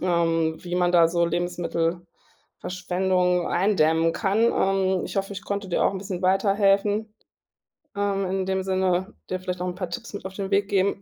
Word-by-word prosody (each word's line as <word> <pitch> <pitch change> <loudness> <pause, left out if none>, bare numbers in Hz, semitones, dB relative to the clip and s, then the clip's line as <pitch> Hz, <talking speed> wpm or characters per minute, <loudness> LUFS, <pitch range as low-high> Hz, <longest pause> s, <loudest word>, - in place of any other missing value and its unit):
ähm, 165 -2 +1
wie 175 0 -4
man 180 0 +2
da 170 -2 +6
so 170 0 +1
Lebensmittelverschwendung 180 +1 -2
eindämmen 165 -3 +2
kann. 205 +3 +1
Ähm, 190 -1 +1
ich - - -7
hoffe, 195 +1 -1
ich 200 - -7
konnte 200 -1 -3
dir 175 - +1
auch - - +3
'n 190 - -4
bisschen 190 -2 -5
weiterhelfen, 200 +2 +2 0.8
ähm, 200 -1 0
in 190 0 -2
dem 190 0 0
Sinne, 185 +1 0
dir 185 - -2
vielleicht 180 -1 -4
noch 180 - -2
'n 180 - -4
paar 180 -2 -5
Tipps 215 +5 -7
mit 200 - -6
auf 190 0 -7
den 195 -1 -4
Weg 200 0 +2
geben. 195 0 +1
185 Hz, 180 wpm, -24 LUFS, 175-195 Hz, 0.8 s, da